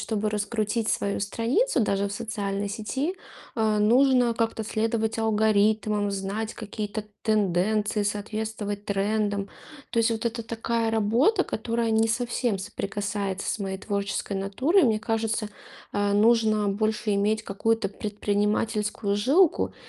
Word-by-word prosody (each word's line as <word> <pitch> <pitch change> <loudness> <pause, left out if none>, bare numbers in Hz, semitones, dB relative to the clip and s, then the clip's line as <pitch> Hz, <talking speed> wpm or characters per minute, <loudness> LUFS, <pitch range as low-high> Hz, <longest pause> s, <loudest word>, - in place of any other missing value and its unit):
чтобы 215 -1 -1
раскрутить 215 +1 -1
свою 200 0 0
страницу 240 - +1
даже 200 -1 +1
в - - -6
социальной 205 -2 -3
сети, 265 - -2 0.4
а, 215 -2 +1
нужно 245 +2 +4
как-то 225 -1 -1
следовать 220 +1 -1
алгоритмам, 215 -1 +2
знать 200 +3 -3
какие-то 210 -1 -5 0.2
тенденции, 210 0 +1
соответствовать 210 0 -3
трендам. 205 0 0 0.4
То 230 - -1
есть 230 +1 +3
вот 225 +1 -2
это 230 0 -2
такая 230 0 -1
работа, 235 - +3
которая 230 +1 -1
не 220 0 +3
совсем 235 -2 0
соприкасается 200 0 -3
с - - -4
моей 190 -1 -3
творческой 200 0 -3
натурой. 265 - +2
Мне 220 -3 +2
кажется, 225 -1 -1 0.4
а, 205 0 +1
нужно 215 -1 +3
больше 215 +1 0
иметь 215 +2 +1
какую-то 215 +1 0
предпринимательскую 210 0 -1
жилку. 285 - +3
215 Hz, 125 wpm, -26 LUFS, 205-225 Hz, 0.4 s, нужно